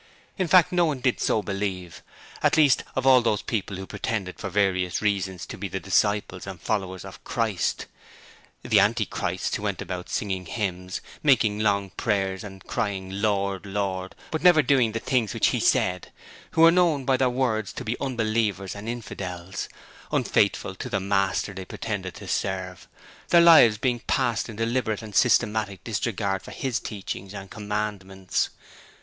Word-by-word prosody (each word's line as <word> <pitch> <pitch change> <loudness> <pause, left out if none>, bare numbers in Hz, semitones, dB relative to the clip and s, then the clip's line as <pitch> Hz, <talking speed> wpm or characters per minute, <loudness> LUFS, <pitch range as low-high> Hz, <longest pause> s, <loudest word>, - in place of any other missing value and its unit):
In 185 -3 -1
fact, 175 +1 +6
no 175 -1 +3
one 150 -5 -1
did 125 -1 +1
so 110 - +1
believe; 95 -3 -4 0.4
and - - +3
least 145 -5 +5
of 130 - -1
all 130 -1 +7
those 110 -3 0
who 100 -4 -3
pretended 95 -2 -4
for 100 - -4
various 95 -2 +1
reasons 95 -4 -1
to - - -9
be - - -3
the - - -4
disciples 100 -3 0
and 95 -3 -7
followers 95 -2 -3
of - - -11
Christ. 110 -6 -1 0.8
The - - +4
anti - - +3
Christs - - -2
who - - -4
went - - -2
about - - -5
singing 95 -3 -2
hymns, 90 -2 -3 0.2
making 115 -8 +3
long 100 -3 +1
prayers 95 -3 -1
and 95 -2 -10
crying 95 -2 -3
Lord, 100 -2 0
Lord, 95 -2 -3 0.2
but 160 - -2
never 175 -4 +6
doing 125 -4 +3
the 115 - -1
things 120 -4 0
which - - +3
He - - 0
said, 90 -1 +1 0.4
who 160 - +2
were 165 0 +9
known 170 -6 +2
by 135 - +3
their 130 -1 +2
words 120 -5 0
to - - -6
be 110 +2 -1
unbelievers 110 -6 -1
and 105 +2 -6
infidels, 95 -6 -5 0.4
unfaithful - - +1
to - - -7
the - - 0
Master 100 0 0
they 95 0 -6
pretended 95 -3 -5
to - - -10
serve, 95 -2 -3 0.4
their 170 - +6
lives 160 -11 +8
being 120 +1 0
passed 120 -1 0
in 110 - -7
deliberate 115 -1 -1
and 105 -2 -9
systematic 105 -4 +2
disregard 100 -4 -2
of - - -8
His 130 -3 -1
teachings 100 -1 -6
and 95 -1 -8
Commandments. 105 -3 -2
105 Hz, 165 wpm, -25 LUFS, 95-120 Hz, 0.8 s, were